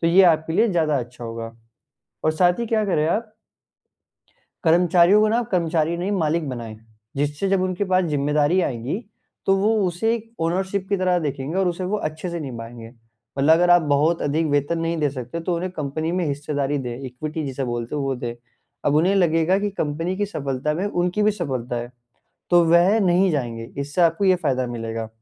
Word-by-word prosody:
तो 165 - +1
ये 175 +3 +6
आपके 160 -1 +3
लिए 225 +7 +3
ज़्यादा 160 -7 +1
अच्छा 120 0 -7
होगा। 115 0 -6 0.7
और 155 - +4
साथ 175 +4 +2
ही 235 - -1
क्या 220 -1 +1
करें 155 -6 +1
आप 215 +4 -2 1.3
कर्मचारियों 175 +4 +5
को 215 - +3
ना 225 - +2
आप 240 - -2
कर्मचारी 165 -2 +1
नहीं 180 +3 -2
मालिक 160 -4 0
बनाएँ, 115 -4 -6 0.4
जिससे 145 +7 -1
जब 190 -1 +2
उनके 185 +2 -1
पास 185 -1 +2
जिम्मेदारी 150 +2 +1
आएगी, 125 +3 -2 0.5
तो 195 - +4
वो 195 +2 +2 0.2
उसे 200 +6 0
एक 225 0 -8
ओनरशिप 190 +3 -1
की 200 - +1
तरह 185 -1 +2
देखेंगे 145 0 -3
और 190 -1 +2
उसे 175 +1 -3
वो 195 +4 -1
अच्छे 155 +3 -7
से 170 -1 -4
निभाएँगे। 115 -4 -8 0.5
मतलब 140 +4 +5
अगर 175 +2 +3
आप 175 -1 +6
बहुत 150 +3 +2
अधिक 155 +3 0
वेतन 145 +3 +1
नहीं 165 +1 -1
दे 150 -2 +1
सकते, 130 +4 -6
तो 175 +1 -1
उन्हें 180 +2 -3
कंपनी 155 +3 -2
में 180 -1 0
हिस्सेदारी 145 0 -2
दे, 125 -3 -4
इक्विटी 155 +5 -5
जिसे 135 0 -3
बोलते 120 +1 -4
हैं 145 - -1
वो 135 -1 -1
दे, 120 -1 -5 0.5
अब 145 - +2
उन्हें 180 +6 +3
लगेगा 170 0 +3
कि 205 0 -1
कंपनी 165 0 -2
की 205 +1 -1
सफलता 140 -4 -2
में 180 - -2
उनकी 180 +1 0
भी 210 - +4
सफलता 130 - -3
है। 120 +1 -5 0.6
तो 175 -1 +6
वह 175 +6 +4
नहीं 185 0 +3
जाएँगे 120 -6 -3 0.2
इससे 145 +5 -2
आपको 170 +3 +3
ये 185 -1 +5
फायदा 130 -2 +1
मिलेगा 115 -1 -4
165 Hz, 195 wpm, -22 LUFS, 140-185 Hz, 1.3 s, ये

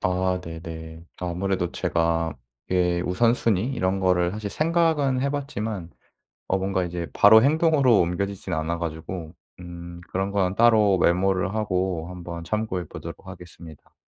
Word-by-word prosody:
아 90 0 0
네네. 80 -1 -8 0.2
아무래도 90 0 -1
제가 85 -1 0 0.4
예 90 -1 +2
우선순위 115 +3 +1
이런 95 -5 0
거를 90 -2 +2
사실 105 -1 -5
생각은 155 - +1
해 140 +1 0
봤지만 110 - -4 0.6
어 95 - +1
뭔가 95 -1 -1
이제 85 -1 -4
바로 110 +2 +7
행동으로 145 -5 +4
옮겨지지는 90 0 -2
않아 85 +2 -2
가지고 80 +1 -5 0.3
음 85 0 -9
그런 95 +1 -1
건 95 -2 +1
따로 110 -5 +5
메모를 95 +3 +2
하고 95 -5 -1
한번 85 -2 -7
참고해 95 -2 -2
보도록 - - -9
하겠습니다. 85 -3 -12
90 Hz, 305 characters per minute, -24 LUFS, 85-110 Hz, 0.6 s, 바로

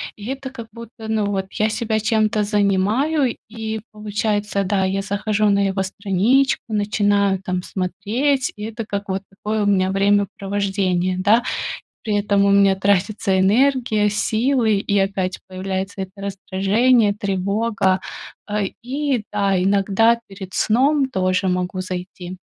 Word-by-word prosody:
и 205 - -10
это 270 0 -5
как 230 -4 -9
будто, 230 -1 -10
ну, 220 -2 +1
вот 195 -1 -2
я 215 - +1
себя 220 0 -1
чем-то 215 -1 +1
занимаю, 210 +8 +1
и 220 -1 -4
получается, 210 -1 -1
да, 195 0 +1
я 195 +1 -1
захожу 210 +1 0
на 200 0 +3
его 190 0 -1
страничку, 200 +8 +1
начинаю 205 -2 +1
там 185 -1 -2
смотреть, 220 +11 -1
и 210 - -8
это 225 +1 -5
как 200 -1 -4
вот 190 +1 -1
такое 210 +2 -2
у - - 0
меня 190 -2 +2
времяпровождение, 195 -2 0
да. 215 +5 +4 0.6
При 215 -2 -1
этом 200 -1 +2
у 200 - +3
меня 200 -1 +5
тратится 195 0 +1
энергия, 220 0 +3
силы, 220 +1 +1
и 200 0 0
опять 195 -1 0
появляется 190 +1 -4
это 190 -1 -6
раздражение, 200 +4 +1
тревога. 200 0 0 0.5
Э, 210 -1 0
и 265 -1 -1
да, 200 -3 +1
иногда 200 +4 +3
перед 195 -1 -10
сном 270 +4 +2
тоже 185 -3 0
могу 180 +1 -1
зайти. 180 0 -7
205 Hz, 140 wpm, -21 LUFS, 195-220 Hz, 0.6 s, меня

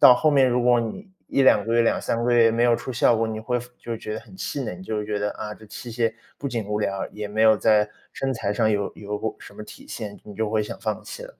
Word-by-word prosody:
到 125 - +10
后 155 +5 +3
面， 135 -3 +5
如 125 0 +2
果 120 -1 +5
你 155 - -5 0.2
1、2 130 -7 +4
个 115 - -1
月， 120 - +5
2、3 115 0 0
个 125 - +2
月 115 -1 +6
没 115 +1 +2
有 120 -1 +5
出 130 - -4
效 120 0 +4
果， 115 +1 +1
你 110 -1 -4
会 125 +3 -1
服 125 - -12
就 115 -1 -5
觉 110 -1 -5
得 110 - -5
很 105 -5 -15
气 140 - -3
馁， 100 - -4
你 90 - -11
就 105 +2 -3
觉 105 0 -2
得， 105 0 -1
啊， 105 -1 -6
这 110 - -15
器 115 +3 -8
械 115 -1 +1 0.2
不 140 - -4
仅 115 -4 -2
无 105 +1 -1
聊， 100 -2 -1
也 105 0 -5
没 105 +1 -2
有 110 -1 +7
在 105 0 +3 0.2
身 135 -1 -2
材 105 -3 -1
上 110 +1 +2
有 100 -2 0
有 105 0 -4
过 110 +2 -3
什 - - -13
么 105 - -8
体 - - -12
现， 105 -3 -6
你 105 - -10
就 110 0 -1
会 110 0 +2
想 105 - -6
放 - - -2
弃 - - -8
了， - - -11
110 Hz, 300 characters per minute, -24 LUFS, 105-120 Hz, 0.2 s, 到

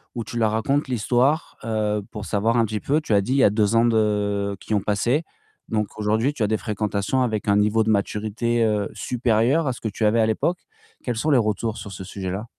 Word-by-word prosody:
où 115 - -3
tu 120 +3 -7
leur 110 -2 +2
racontes 140 +6 0
l'histoire, 125 +6 +1
heu, 105 -2 0
pour 105 -2 -6
savoir 110 +4 0
un 115 - +4
petit 110 -1 -2
peu? 150 +3 0
Tu 115 - -2
as 100 - +5
dit, 125 +7 -1
il - - +1
y - - +5
a - - +7
2 105 +1 +1
ans 115 - +5
de 105 -3 +1
qui 110 - -4
ont 105 - +3
passé. 110 - 0 0.4
Donc 105 -2 -2
aujourd'hui, 110 +6 +1
tu 115 - -2
as - - +2
des 110 - +1
fréquentations 105 +3 -1
avec 110 -3 -2
un 100 - +4
niveau 105 +2 +3
de 110 - -1
maturité, 110 +3 0
heu, 105 -2 +1
supérieur 125 +5 +1
à 130 - 0
ce - - -12
que 110 - -2
tu 105 +2 -2
avais 110 +2 +3
à - - +4
l'époque. 170 +11 0 0.4
Quels 120 -3 -2
sont 155 +6 0
les 140 - +5
retours 110 0 -1
sur 100 - -8
ce 95 0 -8
sujet-là? 95 +2 -5
110 Hz, 240 wpm, -23 LUFS, 105-120 Hz, 0.4 s, a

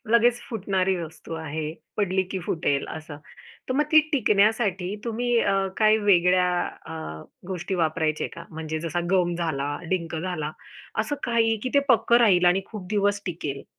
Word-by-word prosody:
लगेच 240 +1 +4
फुटणारी 190 -4 0
वस्तू 165 -1 -7
आहे, 155 -1 -4 0.2
पडली 190 -2 +1
की 190 - -2
फुटेल 145 -4 0
असं, 155 -1 -7 0.5
तर - - 0
मग 290 - +3
ती 310 - +9
टिकण्यासाठी 205 -5 +2
तुम्ही 240 +1 0
अ, 200 - +2 0.2
काही 215 0 +5
वेगळ्या 180 -3 +4 0.4
अ, 160 - -6 0.5
गोष्टी 190 0 -3
वापरायचे 160 -2 0
का 170 - -9
म्हणजे 160 0 -4
जसा 170 +2 -2
गम 180 -2 +2
झाला, 145 -4 -2
डिंक 170 -3 -1
झाला 160 -3 -3 0.5
असं 290 - -2
काही 230 -2 +2
की 255 - -1
ते - - +7
पक्कं 235 -1 +5
राहील 190 -6 +5
आणि 180 +2 +4
खूप 210 -5 -7
दिवस 205 -1 +1
टिकेल? 150 -6 -4
185 Hz, 155 wpm, -25 LUFS, 160-215 Hz, 0.5 s, ती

